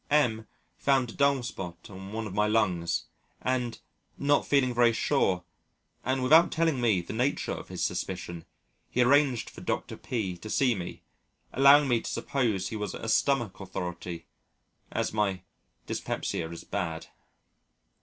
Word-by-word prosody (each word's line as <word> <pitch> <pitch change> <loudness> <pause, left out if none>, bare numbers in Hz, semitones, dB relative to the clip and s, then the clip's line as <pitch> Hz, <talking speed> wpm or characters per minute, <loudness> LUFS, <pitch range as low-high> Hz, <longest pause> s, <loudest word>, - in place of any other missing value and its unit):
M 120 -7 +2 0.3
found 135 -4 +2
a - - -12
dull 140 -2 +2
spot 90 -7 -7
on 95 +1 -9
one 110 +1 -3
of 100 - -6
my 105 +1 +2
lungs, 90 -6 +1 0.4
and, 125 -2 -1 0.4
not 145 +1 +2
feeling 130 -3 +3
very 120 -1 +4
sure, 95 -7 +1 0.6
and 130 0 0
without 160 +6 +6
telling 160 -5 +1
me 110 -7 +3
the 85 - -7
nature 125 +6 0
of - - -5
his - - -4
suspicion, 85 -2 -3 0.4
he 125 - +3
arranged 135 -2 +3
for - - -11
Dr. - - -3
P 100 -8 -3
to 100 +5 -9
see 125 +2 +3
me, 90 -5 -6 0.5
allowing 140 +2 +7
me 120 -3 +2
to - - -5
suppose 115 -9 -1
he - - -5
was 105 -2 -3
a - - -6
stomach 120 -2 +1
authority 90 -3 -5 0.7
as - - -1
my 100 -4 0 0.4
dyspepsia 80 - -3
is 85 - -8
bad. 80 -5 -3
115 Hz, 155 wpm, -28 LUFS, 95-130 Hz, 0.7 s, allowing